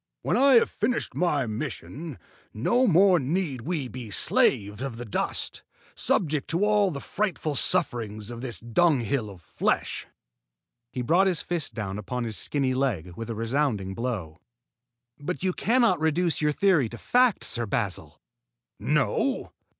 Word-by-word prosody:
"When - - +1
I 275 +1 +5
have 230 - +5
finished 230 +4 -1
my 150 -7 +1
mission, 140 +5 -5 0.4
no 240 - +2
more 185 -1 +5
need 145 -2 -1
we 150 0 -2
be 125 -2 -8
slaves 105 +2 +1
of 135 -4 -4
the 120 - -6
dust, 105 - -2 0.3
subject 150 -5 0
to 175 +5 +2
all 210 -2 +3
the 145 -5 -5
frightful 180 -4 -2
sufferings 110 -4 -1
of 120 0 -7
this 125 -3 -3
dunghill 120 -2 +1
of 95 -3 -12
flesh." - - -1 0.8
He 125 - -3
brought 175 +9 +4
his 180 -3 0
fist 175 -4 -3
down 105 -3 -4
upon 125 +4 -3
his 110 -2 -3
skinny 135 +1 0
leg 110 -11 -1
with 115 +3 -6
a 115 - -3
resounding 115 -4 -1
blow. 95 -8 -4 0.8
"But 175 +5 -4
you 185 -1 +1
cannot 230 -5 +2
reduce 160 +1 +1
your 150 0 +3
theory 160 - +3
to 120 - -8
fact, 250 - +2
Sir 120 -1 -1
Basil!" 100 -1 -3 0.6
"No?" - - 0
135 Hz, 150 wpm, -26 LUFS, 115-175 Hz, 0.8 s, I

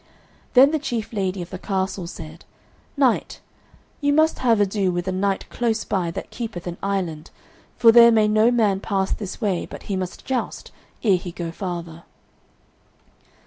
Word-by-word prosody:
Then 270 +3 +8
the 315 - 0
chief 235 -6 -4
lady 190 -3 -2
of 170 - -13
the 185 - -6
castle 190 -2 -2
said, 160 -1 -10 0.5
"Knight, 260 -4 +1 0.6
you 285 -1 +1
must 315 +2 +3
have 235 -4 +3
ado 195 -2 +1
with 175 +1 -3
a - - 0
knight 195 +1 -1
close 230 -2 -1
by 180 -4 -1
that 165 - -7
keepeth 220 -8 -6
an 175 -1 -6
island, 180 -6 -3 0.5
for 230 -2 +7
there 235 0 +8
may 215 -2 +4
no 215 +2 +4
man 215 -5 +2
pass 195 -1 -1
this 200 -3 -4
way 200 -6 -1
but - - -10
he 200 - -3
must 185 -1 -5
joust, 260 -2 -3 0.3
ere 200 -5 +4
he 175 0 -7
go 170 -1 -5
farther." 170 -2 -6
195 Hz, 170 wpm, -22 LUFS, 180-230 Hz, 0.6 s, Then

